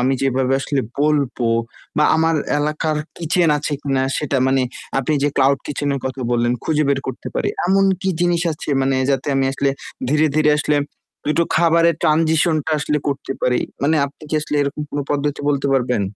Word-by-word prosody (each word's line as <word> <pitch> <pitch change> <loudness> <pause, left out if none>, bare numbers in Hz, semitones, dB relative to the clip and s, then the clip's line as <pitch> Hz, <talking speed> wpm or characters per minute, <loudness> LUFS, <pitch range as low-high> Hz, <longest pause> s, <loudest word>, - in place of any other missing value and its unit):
আমি 130 +2 +2
যেভাবে 130 -1 +1
আসলে 140 0 -1 0.2
বলব 145 -3 +1 0.6
বা 150 - +4
আমার 160 +1 +2 0.2
এলাকার 150 +1 -1 0.2
কিচেন 170 +1 +2
আছে 150 +1 -3
কিনা 135 -2 0 0.2
সেটা 145 -2 -1
মানে 135 0 +2 0.4
আপনি 135 +3 0
যে 145 - +4
ক্লাউড 135 0 +4
কিচেন 145 0 -3
এর 135 - -3
কথা 130 0 -4
বললেন 120 0 +2
খুঁজে 155 -1 +1
বের 140 -1 +2
করতে - - -5
পারি। - - 0 0.2
এমন 195 +1 +3 0.2
কি 190 - -1
জিনিস 175 -1 +2
আছে 150 - -9
মানে 135 0 +1
যাতে 135 -2 0
আমি 135 - +2
আসলে 140 0 0 0.4
ধীরে, 155 +1 +3
ধীরে 155 -1 +4
আসলে 150 0 +1 0.5
২ - - 0
টো 170 - +4
খাবারের 170 0 +4
ট্রানজিশন 160 0 +3
টা 160 - 0
আসলে 150 0 0
করতে 140 -1 -3
পারি? 125 -1 +2 0.2
মানে 155 +3 +3
আপনি 140 +3 -16
কি - - -1
আসলে 150 0 -3
এরকম 140 +1 -3
কোনো 145 - -2
পদ্ধতি 145 0 -1
বলতে 140 -1 0
পারবেন? 125 -4 +1
145 Hz, 190 wpm, -20 LUFS, 135-155 Hz, 0.6 s, বা